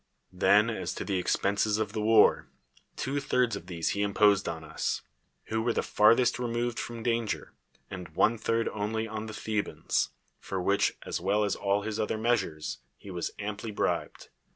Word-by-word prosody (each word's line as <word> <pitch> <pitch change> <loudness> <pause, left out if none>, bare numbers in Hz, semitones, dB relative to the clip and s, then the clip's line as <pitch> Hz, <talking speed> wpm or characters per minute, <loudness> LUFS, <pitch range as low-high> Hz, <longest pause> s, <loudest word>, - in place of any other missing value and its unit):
Then - - +4
as - - -4
to - - -4
the 95 -1 0
expenses 100 +3 +1
of 105 -2 -2
the 110 - -2
war, 110 0 +5 0.5
two 140 +2 -2
thirds 125 -4 +1
of 85 - -8
these 85 -3 -2
he 100 - -1
imposed 100 0 +3
on 80 -1 -5
us, 80 +1 -2 0.5
who 110 0 0
were 120 +1 +1
the - - 0
farthest 115 +4 +4
removed 120 -1 -1
from 115 -1 -5
danger, 115 -2 -1 0.3
and 90 -3 -7
one 115 +5 +3
third 115 +1 0
only 110 +1 -2
on 110 0 -5
the 110 - -7
Thet)ans; 105 -1 -1 0.3
for 95 - -4
which, 100 +2 +2
as - - -2
Avell 100 +4 +1
as 100 - 0
all 100 +1 0
his 110 0 -3
other 110 0 0
measures, 105 -9 -1 0.2
he 100 - -10
was 90 -2 -2
amply 105 +2 -4
bribed. 105 - -2
105 Hz, 175 wpm, -29 LUFS, 100-115 Hz, 0.5 s, war